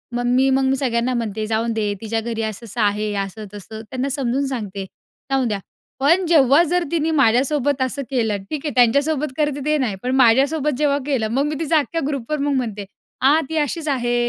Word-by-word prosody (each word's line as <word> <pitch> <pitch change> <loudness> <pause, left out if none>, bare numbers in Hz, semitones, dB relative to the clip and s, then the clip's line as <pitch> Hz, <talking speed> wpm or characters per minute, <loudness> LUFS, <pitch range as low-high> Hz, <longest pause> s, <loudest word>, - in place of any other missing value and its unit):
मग 245 - -1
मी 255 +2 +3
मग 265 0 +2
मी 265 0 +2
सगळ्यांना 245 -1 0
म्हणते 220 -3 -2
जाऊन 225 +1 0
दे 210 -2 -1
तिच्या 225 0 -2
घरी 225 0 -3
असं-असं 220 +1 -4
आहे, 210 +1 +1
असं 195 +3 -8
तसं 220 +2 -9
त्यांना 255 +4 -4
समजून 270 0 -1
सांगते, 205 -7 -4 0.5
जाऊ 270 -1 +2
द्या, 210 -4 -1 0.4
पण 335 +7 +3
जेव्हा 290 -2 +5
जर 355 0 +2
तिने 320 -1 0
माझ्यासोबत 270 +3 +2
असं 260 +2 -1
केलं 225 -6 0
ठीक 305 -1 -4
हे, - - 0
त्यांच्यासोबत 280 +4 +2
करते 290 -2 -1
ते 305 0 +2
नाही. 245 -8 -1
पण 255 +1 0
माझ्यासोबत 270 +3 +3
जेव्हा 285 -1 +2
केलं, 260 -7 0
मग 275 +4 +1
मी 300 0 -2
तिचा 325 0 +2
अख्ख्या 330 +3 -3
ग्रुपवर 290 +1 -2
मग 285 0 0
म्हणते, 215 -6 -3 0.4
"आ, 285 +4 +5
ती 320 - -2
अशीच 310 +1 -1
आहे, 240 -3 0
260 Hz, 195 wpm, -21 LUFS, 225-290 Hz, 0.5 s, जेव्हा